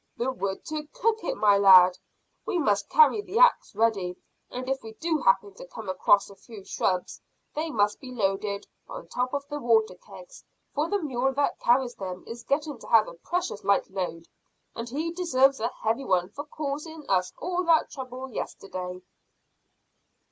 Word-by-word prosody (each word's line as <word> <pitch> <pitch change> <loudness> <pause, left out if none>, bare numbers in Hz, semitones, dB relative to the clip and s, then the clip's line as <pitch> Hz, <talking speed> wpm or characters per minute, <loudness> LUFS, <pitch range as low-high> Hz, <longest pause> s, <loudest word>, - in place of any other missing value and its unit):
"The 250 +3 0
wood 195 -6 -4
to 305 -1 -5
cook 450 0 0
it, - - -2
my 205 -2 +4
lad. 185 -2 +8 0.5
We - - -2
must 210 -11 +1
carry 455 -2 +5
the 415 +1 -5
axe - - +4
ready, 200 -5 +1 0.3
and 255 +1 -6
if 270 0 -1
we 220 0 -10
do 320 +5 -1
happen 200 -2 +2
to 180 - -11
come 215 +2 -8
across 195 +2 +3
a 200 - -14
few 210 0 -12
shrubs 185 -1 -2 0.3
they 315 +2 -2
must 205 -6 +1
be 260 -3 -10
loaded 200 -2 -1 0.2
on - - -8
top 250 +1 -1
of 280 -1 -3
the 295 0 -5
water 225 -4 +2
kegs, - - -14 0.3
for 300 +3 -1
the 410 - +1
mule 270 -4 -1
that 285 +1 0
carries 245 0 +2
them 185 -3 -7
is 235 +1 -8
getting 290 0 -2
to - - -12
have 225 -2 +5
a - - -8
precious 335 - -3
light 200 -1 +1
load, 175 -3 -4 0.5
and 230 +1 -6
he 310 +6 -2
deserves 275 -6 +2
a 225 - 0 0.2
heavy 225 +5 0
one 180 -5 +1
for 285 +6 -7
causing 300 +1 -6
us 185 -1 +1
all 360 0 -2
that 330 -1 +3
trouble 260 -1 -7
yesterday." 180 -4 -6
245 Hz, 180 wpm, -27 LUFS, 200-300 Hz, 0.5 s, lad